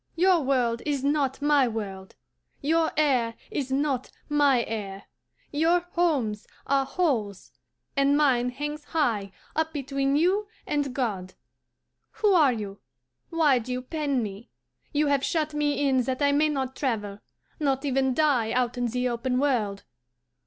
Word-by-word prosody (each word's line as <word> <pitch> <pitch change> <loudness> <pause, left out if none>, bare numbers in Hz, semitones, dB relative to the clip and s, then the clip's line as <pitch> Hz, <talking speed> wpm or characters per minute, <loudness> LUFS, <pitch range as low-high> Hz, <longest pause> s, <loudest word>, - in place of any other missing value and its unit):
Your 365 +1 +4
world 250 -4 +1
is 285 -3 -1
not 280 -1 0
my 290 -3 +4
world; 195 -4 -6 0.4
your 320 +2 +1
air 255 -7 +2 0.2
is 270 -3 -3
not 270 -2 0 0.2
my 285 -4 +3
air; 200 -3 -5 0.5
your 330 +4 +3
homes 270 -12 0 0.2
are 275 -1 +1
holes, 230 - -1 0.4
and 280 0 +3
mine 250 -5 +3
hangs 295 +4 -5
high 230 -11 -1 0.2
up 320 0 0
between 275 -1 -1
you 375 +7 +2 0.2
and 285 -3 -1
God. 195 -8 -3 0.8
Who 420 -2 +2
are 305 -7 +5
you? 205 -4 -5 0.5
Why 310 -6 +3
do 245 +2 -7
you 250 0 -3
pen 280 -3 -1
me? 205 +2 -7 0.4
You 300 +1 +2
have 280 -1 +1
shut 310 -1 0
me 290 -1 +1
in 260 -2 +3
that 260 +2 -1
I 285 - +4
may 300 +2 +3
not 265 -3 -2
travel, 210 -7 -2 0.4
not 275 -2 0
even 265 -1 +1
die 270 -8 +2
out 250 0 0
in 245 - +1
the 250 +2 -1
open 245 +1 -1
world. 230 -8 0
270 Hz, 150 wpm, -26 LUFS, 240-295 Hz, 0.8 s, are